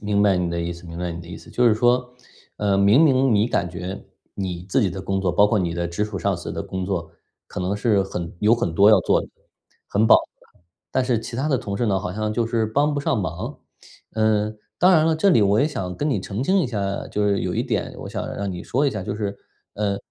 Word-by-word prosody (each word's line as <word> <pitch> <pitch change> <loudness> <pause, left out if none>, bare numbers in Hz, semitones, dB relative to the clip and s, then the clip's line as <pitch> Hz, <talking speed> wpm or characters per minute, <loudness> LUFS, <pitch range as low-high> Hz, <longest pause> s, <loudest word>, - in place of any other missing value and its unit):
明 105 -1 0
白 100 -3 +4
你 90 -1 -1
的 85 0 -2
意 85 +1 -2
思 85 +1 -12
明 85 +1 -8
白 90 -1 -3
你 85 - -7
的 85 - -12
意 85 - -7
思。 - - -15
就 120 -1 +3
是 110 - +4
说， 125 +2 +2 0.4
呃， 100 -1 +1
明 100 +7 +5
明 135 -3 +3
你 105 +2 +3
感 100 -7 0
觉 90 +3 -6 0.3
你 90 -3 -4
自 - - +2
己 95 - +1
的 95 - -5
工 95 0 -2
作， 95 -2 +1
包 100 +4 +4
括 105 +1 +1
你 85 -3 -1
的 85 0 -2
直 85 +5 -2
属 105 -3 -5
上 100 -1 0
司 85 - -7
的 - - -4
工 95 -1 -4
作， 90 -4 -3 0.3
可 - - -6
能 95 +3 -1
是 105 -1 +2
很 90 -3 -5
有 105 +2 +4
很 115 -9 -2
多 100 +4 +6
要 105 - +7
做 - - +3
的 - - -8 0.6
很 105 +2 +2
饱 - - +8
和。 - - -1 0.7
但 130 - +1
是 125 -3 +2
其 115 +1 -7
他 140 +3 0
的 135 - +2
同 100 -4 -4
事 120 - 0
呢， 100 -3 +1
好 95 -2 -4
像 110 +2 -2
就 115 +1 0
是 115 -1 0
帮 145 +7 +1
不 145 - -1
上 140 - 0
忙。 85 0 -5 0.6
嗯， 110 -1 +1 0.2
当 185 +1 +6
然 160 -3 +5
了， 160 -1 +2
这 195 +5 +3
里 115 - +5
我 100 +2 +3
也 - - +3
想 90 - -4
跟 150 - -1
你 115 - 0
澄 105 +6 -4
清 190 +5 +3
一 155 - +1
下， 100 -4 -3
就 105 0 -1
是 100 -1 +1
有 90 +1 -2
一 115 - 0
点 110 -7 -2
我 - - -7
想 - - -4
让 100 -1 -3
你 90 -1 -6
说 140 +4 0
一 135 - +1
下， 105 - -4
就 - - -4
是， 100 -2 -3 0.4
呃， 100 -1 -1
100 Hz, 290 characters per minute, -23 LUFS, 90-120 Hz, 0.7 s, 饱